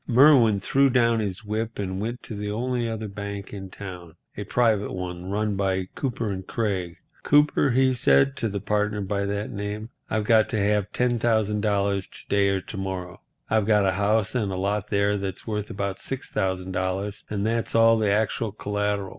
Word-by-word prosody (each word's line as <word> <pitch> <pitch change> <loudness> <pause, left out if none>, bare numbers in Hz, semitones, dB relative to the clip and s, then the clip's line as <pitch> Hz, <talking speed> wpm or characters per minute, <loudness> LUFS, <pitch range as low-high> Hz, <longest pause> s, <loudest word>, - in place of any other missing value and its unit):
Merwin 125 -5 +6
threw 135 +7 +3
down 115 -2 +3
his 100 -2 -3
whip 110 +2 -3
and 95 -1 -3
went 120 +3 -4
to - - -7
the 105 0 -4
only 120 +2 -1
other 110 -1 -4
bank 100 0 -6
in 95 -2 -7
town, 90 -4 -9 0.2
a - - -4
private 110 -4 +2
one, 90 0 -5
run 105 +1 0
by 95 -1 -1
Cooper 115 -6 -2
& - - -29
Craig. 95 -7 -2 0.2
"Cooper," 145 -1 +4
he 130 +1 +3
said, 135 +2 +3
to 115 - -1
the 100 0 -3
partner 105 +1 0
by 100 +1 -1
that 100 +1 -3
name, 105 +2 -5 0.2
"I've 110 -1 0
got 110 +1 +4
to 110 -4 -1
have 105 0 +1
$10,000 105 -5 +1 0.2
to - - -25
day 100 -1 +3
or 95 -1 0
to 95 - -9
morrow. 95 -2 -5 0.3
I've 110 -2 +1
got 105 -2 +4
a 95 - +3
house 105 +2 +1
and 115 -6 0
lot 100 +2 -1
there 100 0 +2
that's 95 -1 -5
worth 105 -2 -3
about 100 -1 -3
$6,000 95 -4 -2
and 100 -1 -2
that's 115 +1 -1
all 115 0 +6
the 105 -2 +2
actual 110 +1 0
collateral. 105 -1 -2
105 Hz, 180 wpm, -25 LUFS, 100-115 Hz, 0.3 s, Merwin